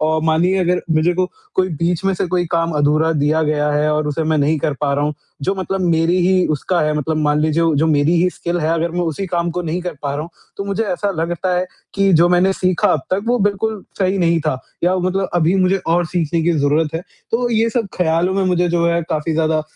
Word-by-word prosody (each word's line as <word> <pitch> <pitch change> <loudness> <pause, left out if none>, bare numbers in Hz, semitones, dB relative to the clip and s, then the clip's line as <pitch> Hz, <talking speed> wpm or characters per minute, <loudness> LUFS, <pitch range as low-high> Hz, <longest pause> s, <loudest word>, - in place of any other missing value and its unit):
और 155 0 +1
मानिए, 170 +4 +2
अगर 180 -1 +1
मुझे 165 +3 +3
को 185 +1 0 0.2
कोई 185 0 +2
बीच 170 +2 0
में 195 - +2
से 185 - -1
कोई 180 0 0
काम 165 0 +1
अधूरा 155 +3 +2
दिया 155 +1 +1
गया 150 -1 0
है 150 +1 +1
और 150 0 0
उसे 150 +2 -2
मैं 155 0 +1
नहीं 150 +2 +1
कर 150 - -1
पा 145 -2 +1
रहा 145 +1 0
हूँ, 150 0 -2 0.3
जो 190 +7 0
मतलब 190 0 -3
मेरी 170 0 +2
ही 185 -1 +3
उसका 170 +4 0
है, 155 0 +1
मतलब 155 +2 -2
मान 150 -1 +1
लीजिए 160 +1 +2
जो 160 - +3
मेरी 150 +1 +2
ही 180 - +2
स्किल 175 0 -3
है, 155 - 0
अगर 165 0 -1
मैं 175 - -2
उसी 175 +3 -2
काम 170 -1 -1
को 180 +1 -3
नहीं 170 +2 -2
कर 180 -2 -4
पा 140 -1 -2
रहा 145 - -3
हूँ, 165 - -9 0.3
तो 200 - -4
मुझे 200 +2 -1
ऐसा 200 +1 -1
लगता 170 +3 -2
है, 180 - 0 0.3
कि 195 -1 +2
जो 170 +1 +5
मैंने 180 +2 +3
सीखा 185 -2 +1
अब 155 - 0
तक 185 - +1
वो 245 +1 +2
बिल्कुल 205 0 -1 0.2
सही 190 0 +1
नहीं 170 -1 +2
था 150 -4 -1 0.3
या 180 - +3
मतलब 185 +1 -1
अभी 175 +1 +2
मुझे 185 +1 +3
और 175 +1 +2
सीखने 165 -1 -1
की 170 +2 +2
ज़रूरत 150 +2 +1
है, 165 - -1 0.3
तो 240 +2 0
ये 225 0 +2
सब 230 -2 -1
ख़्यालों 175 +2 +1
में 195 - +1
मुझे 180 -1 +1
जो 170 0 +1
है 170 0 +1
काफ़ी 155 +1 -1
ज़्यादा 155 -1 +1
170 Hz, 250 wpm, -18 LUFS, 155-185 Hz, 0.3 s, जो